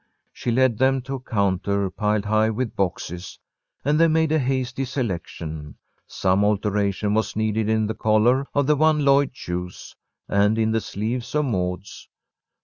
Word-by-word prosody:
She - - -4
led 120 -1 +2
them 130 0 +2
to 135 +1 -6
a 135 - -3
counter 100 -4 0
piled 105 -1 0
high 110 +1 +2
with 115 +2 -3
boxes, 90 -1 -3 0.5
and 150 +2 +2
they 165 - +6
made 160 -1 +2
a 160 - +3
hasty 130 0 -1
selection. 85 - -5 0.3
Some 95 +1 +1
alteration 105 0 0
was 110 -1 0
needed 110 0 0
in 110 0 +2
the 110 - -2
collar 110 +5 +2
of 145 -1 +3
the 150 +2 +3
one 155 0 +3
Lloyd 140 0 +4
chose, 90 -7 -6 0.3
and 105 +2 +2
in 110 0 +1
the 115 0 +1
sleeves 115 +7 -4
of 150 0 +2
Maud's. 90 -4 -4
110 Hz, 160 wpm, -23 LUFS, 100-130 Hz, 0.5 s, they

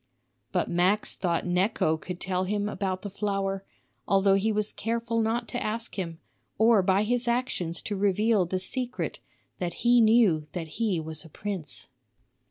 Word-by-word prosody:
But - - +1
Max 185 +5 +2
thought 170 -3 -1
Necho 180 -2 +2
could 175 +3 -7
tell 185 0 -1
him 205 +1 -1
about 190 -3 -3
the 205 - -4
flower, 195 -1 -2 0.4
although 195 0 +4
he 200 +3 +2
was 210 0 0
careful 230 0 -1
not 230 +2 0
to - - -3
ask 225 +2 -2
him, 170 -4 -4 0.4
or 220 -1 +5
by 190 +2 +3
his 245 +2 +1
actions 235 -9 -1
to 205 - -3
reveal 205 0 +2
the 185 - -1
secret 250 +6 -2 0.4
that 175 +4 -4
he 240 0 +6
knew 215 -9 +4
that 165 -3 -4
he 205 -7 +1
was 160 -1 -5
a 165 - -13
prince. 185 -4 -5
195 Hz, 165 wpm, -27 LUFS, 180-220 Hz, 0.4 s, he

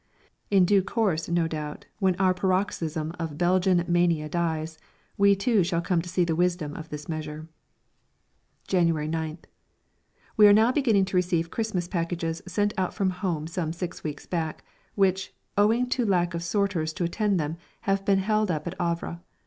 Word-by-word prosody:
In 195 -3 +5
due 200 +1 +4
course, 190 -6 -1
no 170 -1 +2
doubt, 150 -2 -5
when 190 -3 +2
our 185 0 +3
paroxysm 180 -4 -1
of 160 -3 -4
Belgian 180 0 +3
mania 175 -3 +2
dies, 160 -1 -2 0.4
we 200 0 +5
too 200 0 +2
shall 170 -1 0
come 175 0 +1
to 175 - -8
see 185 0 +1
the 165 -1 0
wisdom 175 -3 0
of 160 0 -8
this 150 0 -7
measure. 155 -1 -5 1.2
January 165 -5 +2
9th. 160 0 -3 0.9
We 210 -1 +9
are 205 - +8
now 220 +3 +5
beginning 230 -9 +3
to 190 -1 -1
receive 170 -2 0
Christmas 210 -6 -2
packages 170 -2 -2
sent 205 +3 0
out 185 - -1
from 190 -2 +1
home 180 -4 -2
some 165 -1 -3
six 175 0 -6
weeks 150 -2 -5
back, 160 -3 -3 0.3
which, 190 -1 +1 0.2
owing 225 +5 +3
to 245 - +1
lack 180 -4 +1
of 170 - -3
sorters 170 -3 0
to 175 - -3
attend 200 +3 +1
to 160 - +1
them, 155 +3 -4 0.2
have 195 0 0
been 195 0 +3
held 215 +1 +1
up 155 -3 -2
at 175 - -3
Havre. 170 0 -2
175 Hz, 175 wpm, -26 LUFS, 165-195 Hz, 1.2 s, We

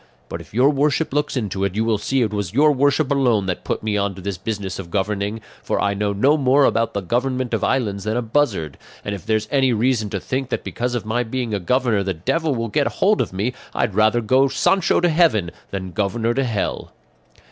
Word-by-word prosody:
But - - -5
if - - -16
your 130 +6 +4
worship 150 +1 0
looks 145 -1 0
into 100 -5 -2
it, 100 -1 -1
you 110 +1 +1
will 110 -2 +1
see 130 +4 +1
it 110 -2 -2
was 100 -3 -3
your 150 +2 +5
worship 145 +1 +2
alone 125 -8 +2
that 90 -2 -3
put - - -3
me 105 -1 0
on 100 -1 -1
to 95 - -10
this 100 0 -3
business 100 -2 -4
of 90 -3 -7
governing; 100 +3 -2 0.2
for - - -1
I 100 0 +1
know 100 0 -1
no 135 +10 +3
more 135 0 +4
about 115 -1 +1
the 100 - 0
government 125 +4 -1
of - - 0
islands 105 -7 0
than 110 +2 -1
a 125 - -1
buzzard; 110 - -1 0.3
and 105 - -2
if 95 -5 -8
there's 110 -1 0
any 135 -3 +3
reason 115 -1 +1
to 100 - -3
think 130 +5 -3
that - - -2
because 125 +1 -3
of 115 - -3
my 110 +3 0
being 120 -1 -3
a 100 - 0
governor 120 +2 +1
the 95 -2 -2
devil 150 - -1
will 115 -1 -2
get 140 +7 +1
hold 210 +2 +2
of - - -2
me, 100 +7 -2 0.2
I'd 105 - 0
rather 110 +4 +3
go 130 +5 +3
Sancho 190 +7 +2
to 175 - +3
heaven 155 - +2 0.2
than 95 -2 -5
governor 110 +4 0
to 135 +2 0
hell." 110 -5 -3
115 Hz, 235 wpm, -21 LUFS, 100-130 Hz, 0.3 s, your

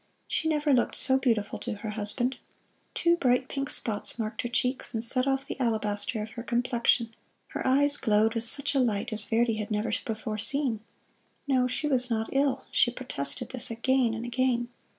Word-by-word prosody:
She 320 - -1
never 300 -2 +1
looked 245 - +1
so 265 0 +2
beautiful 225 -6 -1
to 240 - -4
her 210 +1 -6
husband. 225 +5 -1 0.6
Two 340 0 +2
bright 255 -4 +1
pink 275 -1 -4
spots 210 -1 0
marked 220 -1 -3
her 240 - -4
cheeks, 250 0 -1
and 225 - -2
set 255 +3 +3
off 270 0 0
the - - -7
alabaster 215 -2 -1
of 220 - -9
her 235 - -7
complexion. 235 -1 0 0.4
Her - - -4
eyes 285 +2 +3
glowed 220 -3 +2
with 230 -1 -2
such 280 +5 +7
a 275 - +1
light 220 -4 -1
as 210 -1 -2
Verdi 230 0 +1
had 210 -1 -5
never 210 +1 -2
before 215 -1 -5
seen. 245 0 +2 0.7
No, 255 -2 +2
she 300 +4 -2
was 255 -3 +1
not 225 -1 -2
ill 270 -1 0
she - - +3
protested 140 - -3
this 255 -3 -1
again 235 0 0
and 225 +1 -6
again. 240 0 -1
240 Hz, 190 wpm, -27 LUFS, 220-260 Hz, 0.7 s, such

